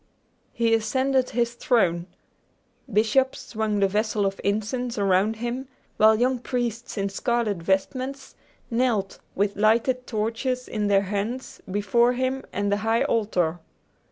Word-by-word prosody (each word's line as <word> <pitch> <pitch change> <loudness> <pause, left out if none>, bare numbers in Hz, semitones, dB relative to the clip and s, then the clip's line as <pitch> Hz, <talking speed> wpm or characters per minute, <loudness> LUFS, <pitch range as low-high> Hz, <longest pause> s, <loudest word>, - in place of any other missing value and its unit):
He 230 -1 +1
ascended 260 +4 +1
his 235 0 0
throne. 180 -8 +1 0.8
Bishops 225 +6 +2
swung 215 -2 -1
the 195 - +5
vessels 210 +1 0
of 195 0 -2
incense 225 +4 -1
around 200 +2 +2
him, 240 +4 -4 0.3
while 220 0 +5
young 255 +1 +2
priests, 235 -2 -3
in 200 0 0
scarlet 230 0 0
vestments, 255 +10 -2 0.4
knelt, 230 -5 0 0.2
with 200 +1 0
lighted 235 +4 +2
torches 230 +4 -2
in 210 -1 -1
their 200 -1 +4
hands, 210 +6 -4
before 205 +5 +2
him 260 +1 -1
and 205 0 -1
the 205 - +2
high 225 +2 +1
altar. 180 -7 0
220 Hz, 130 wpm, -25 LUFS, 205-245 Hz, 0.8 s, the